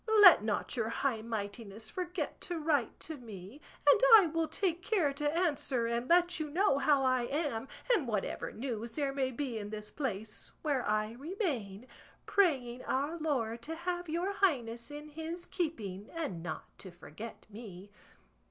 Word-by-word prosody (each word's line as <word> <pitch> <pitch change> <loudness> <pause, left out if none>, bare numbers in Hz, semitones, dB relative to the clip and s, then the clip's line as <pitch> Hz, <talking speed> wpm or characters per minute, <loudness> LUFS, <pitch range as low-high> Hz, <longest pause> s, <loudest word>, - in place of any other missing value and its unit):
Let 365 - +10
not 215 +5 -1
your 225 -3 0
high 230 -1 0
mightiness 220 -1 -5
forget 360 -4 -4
to 350 - -3
write 300 -7 0
to 315 -1 -6
me; 220 +2 -10 0.3
and 440 - +7
I 415 -4 +8
will 325 0 0
take 350 -2 -1
care 355 -8 +1
to 295 +3 -1
answer, 290 -8 +1
and 235 +2 -1
let 350 +1 +4
you 310 -1 -2
know 310 -3 +3
how 280 -2 +4
I 255 -2 +2
am, 275 -5 -2 0.3
and 325 - +2
whatever 210 -4 -2
news 235 -2 -4
there 280 -3 0
may 270 -2 0
be 255 -3 -3
in 205 -1 -6
this 210 0 -6
place, 220 -6 -4
where 285 -5 +1
I 215 0 +1
remain, 255 - -3 0.4
praying 260 -11 +2
our 285 +5 0
Lord 235 -7 -1
to 320 +7 -5
have 350 0 -3
your 350 +5 0
highness 240 -12 0
in 295 +1 -8
his 325 +3 -6
keeping 215 - -3
and 295 - -4
not 165 -2 -4 0.2
to 190 - -9
forget 180 +5 -10
me. 205 -3 -10
270 Hz, 165 wpm, -32 LUFS, 225-325 Hz, 0.4 s, Let